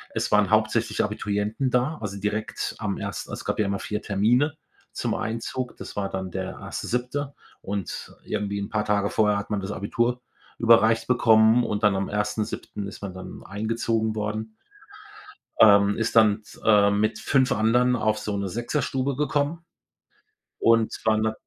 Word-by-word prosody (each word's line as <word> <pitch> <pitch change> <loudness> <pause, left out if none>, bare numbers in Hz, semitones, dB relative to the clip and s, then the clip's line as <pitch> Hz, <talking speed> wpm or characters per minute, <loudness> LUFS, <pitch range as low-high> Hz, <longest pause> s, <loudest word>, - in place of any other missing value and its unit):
es - - -1
waren 105 -2 +4
hauptsächlich 110 +1 +2
Abiturienten 105 +4 -1
da, 125 +6 +1
also, 100 -2 -4
direkt 105 +2 -3
am - - -2
ers - - -5
es - - -7
gab - - -2
ja 105 - +3
immer 100 0 -1
4 105 0 -4
Termine 120 +10 +1 0.4
zum - - -2
Einzug. 115 +3 -4
Das - - -9
war 100 -1 -1
dann 95 -1 -4
der 95 +1 -5
1. - - -6
7. 135 +4 -2 0.3
und 100 -3 -5
irgendwie 100 -1 -3
'n 100 - -4
paar 105 0 -1
Tage 100 -1 +1
vorher 105 -1 +2
hat 100 - -5
man 105 - -1
das 95 - -5
Abitur 120 +5 -1 0.4
überreicht 115 -1 +4
bekommen 115 -1 +5
und 105 -1 -3
dann 105 -2 +4
am 95 0 -1
1. 105 +1 -1
7. 100 -1 -6
ist 100 - -10
man 100 -3 -5
dann 95 0 -9
eingezogen 110 +2 -1
worden. 110 +1 -4 1.0
Ähm, 100 -1 +6
ist 115 0 -1
dann 110 -1 +5
t - - -16
äh, 105 -2 +5
mit 110 +2 0
5 130 -2 +2
anderen 120 +4 +3
auf 110 -1 0
so 105 -1 -3
'ne 100 -1 -2
Sechserstube 130 +4 -2
gekommen 150 +3 -1 1.0
und 115 -1 +3
waren 110 0 +3
dann 110 - 0
110 Hz, 170 wpm, -25 LUFS, 105-115 Hz, 1.0 s, Ähm